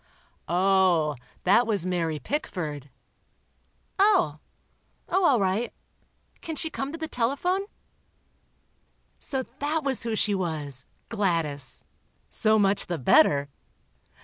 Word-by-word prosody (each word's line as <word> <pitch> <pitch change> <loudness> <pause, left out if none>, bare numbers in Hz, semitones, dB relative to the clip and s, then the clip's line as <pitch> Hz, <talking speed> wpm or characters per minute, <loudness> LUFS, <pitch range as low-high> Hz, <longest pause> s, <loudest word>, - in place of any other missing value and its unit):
'" - - -40
"Oh, 180 -4 +3 0.3
that 240 0 +4
was 205 -6 0
Mary 170 -4 -1
Pickford." 150 - -4 1.1
"Oh—oh, 380 - 0
all 275 -8 +5
right—can 220 - -5
she 320 +1 -4
come 270 -1 -4
to 330 - -6
the 320 -1 -4
telephone?" 310 +11 0 1.5
So 265 -2 -3 0.2
that 305 +2 -1
was 270 -2 0
who 230 -1 -1
she 210 -1 +1
was—Gladys... 160 - -2 0.5
so 220 0 +2
much 200 -1 +2
the 175 - -2
better. 140 +2 +4
195 Hz, 100 wpm, -26 LUFS, -, 1.5 s, all